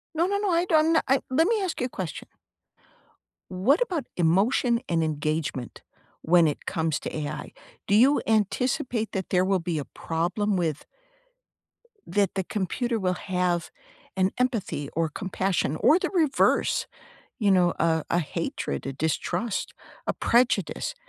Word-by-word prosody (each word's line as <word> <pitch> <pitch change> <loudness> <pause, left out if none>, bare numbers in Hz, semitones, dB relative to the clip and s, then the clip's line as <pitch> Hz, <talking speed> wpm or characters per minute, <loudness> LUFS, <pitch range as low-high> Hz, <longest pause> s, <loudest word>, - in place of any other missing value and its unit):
No, 335 +3 +2
no, 400 +1 0
no, 405 -2 0
I 340 +1 +2
don't 320 -1 +3
I 270 +1 +4
let 320 +6 +3
me 445 -1 +2
ask 350 -8 -3
you 250 - +1
a - - -15
question. 180 -9 -6 1.2
What 220 - +2
about 355 - -1
emotion 200 +8 +2
and 165 -1 +1
engagement, 155 -4 -3 0.4
when 170 0 +4
it 150 - -3
comes 160 -2 -1
to - - -5
AI, 150 -1 -5 0.3
do 200 - 0
you 260 +7 +5
anticipate 225 +1 0
that 190 -2 -4
there 180 0 +3
will 190 -1 +2
be 170 -1 -3
a 145 - -2
problem 175 +8 -2
with 160 -5 -1 1.2
that 200 -3 +1
the 190 - 0
computer 225 +5 -2
will 185 -2 +1
have 180 -2 -1 0.5
an 190 0 +2
empathy 230 - -1
or 165 0 +1
compassion, 185 -3 -1
or 310 - +5
the - - -2
reverse, 315 -8 +2 0.6
you 205 - +3
know, 180 -2 +4
a 160 -1 +2
a 175 - +2
hatred, 70 - -4
a 135 - -3
distrust, 160 - -2 0.3
a - - +1
prejudice, 235 -7 +1
190 Hz, 150 wpm, -26 LUFS, 165-250 Hz, 1.2 s, you